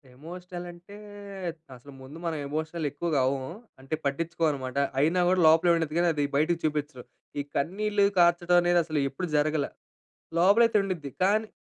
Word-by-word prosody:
Emotional 175 +4 -9
అంటే, 175 +4 -14 0.8
అసలు 125 +3 -14
ముందు 130 +4 -11
మనం 165 -2 -2
ఎమోషనల్ 155 +2 -3
ఎక్కువగా 150 0 -1
అవ్వము. 130 +1 -2 0.3
అంటే 135 +4 -4
పట్టిచ్చుకోమన్నమాట. 145 -3 -1 0.2
అయినా 165 +5 +2
గూడా 185 0 +3
లోపలే 165 +2 +5
ఉండిద్ది 160 -2 -2
గానీ 175 0 +3
అది 145 -1 -1
బయటికి 160 +3 +1
చూపిచ్చను. 150 -4 -2 0.4
ఈ - - +1
కన్నీళ్లు 200 +6 +1
కార్చటం 175 0 +4
అనేది 175 0 +3
అసలు 155 -2 -2
ఎప్పుడు 155 +7 -5
జరగలా. 150 -1 +1 0.7
లోపలయితే 210 +6 +5
ఉండుద్ది. 170 -8 -4
కానీ 215 +3 +2
165 Hz, 145 wpm, -27 LUFS, 145-175 Hz, 0.8 s, లోపలే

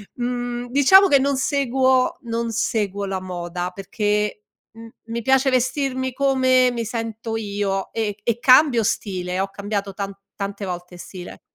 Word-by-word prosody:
mhmm, 245 0 -3
diciamo 380 +9 +7
che 280 -5 +5
non 275 0 +1
seguo 260 -2 +2
non 230 0 -2
seguo 205 -3 -1
la 190 -1 -3
moda 175 -1 -4
perché 210 +1 -2 0.3
m 225 0 -11 0.2
mi 230 +1 -4
piace 265 +2 +3
vestirmi 260 0 0
come 260 -2 +3
mi 235 -1 -3
sento 225 0 -4
io, 200 -2 -2
e 210 -2 -2
e 235 +1 -1
cambio 255 -2 +5
stile, 185 -3 -2
ho 195 +1 -1
cambiato 200 0 -4
tan 200 0 -5 0.2
tante 200 0 -5
volte 180 0 -6
stile. 180 0 -10
225 Hz, 145 wpm, -22 LUFS, 200-255 Hz, 0.3 s, diciamo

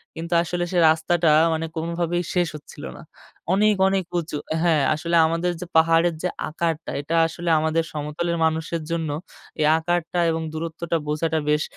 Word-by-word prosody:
কিন্তু 170 +2 -5
আসলে 175 +1 -2
সে 180 - -1
রাস্তাটা 165 +1 +2 0.2
মানে 160 0 -2
কোনভাবেই 170 +1 -1
শেষ 175 -1 +2
হচ্ছিল 150 - -11
না। - - -11 0.5
অনেক, 210 +2 +4
অনেক, 190 0 +1 0.2
উঁচু 160 -2 -5
অ্যা 160 - -1
হ্যাঁ, 160 -5 +3
আসলে 170 +3 -2
আমাদের 165 +2 0
যে - - -4
পাহাড়ের 165 +1 +4
যে 180 - +1 0.2
আকারটা। 165 0 -2
এটা 155 +3 -3
আসলে 170 +1 -4
আমাদের 160 +1 +1
সমতলের 155 +3 -3
মানুষের 160 +1 -1
জন্য 165 -2 -1 0.5
এই 155 - +3
আকারটা 175 +1 -1
এবং 160 0 -2
দূরত্বটা 165 +1 -3
বোঝাটা 160 +1 0
বেশ 150 +1 +2
165 Hz, 165 wpm, -23 LUFS, 160-175 Hz, 0.5 s, অনেক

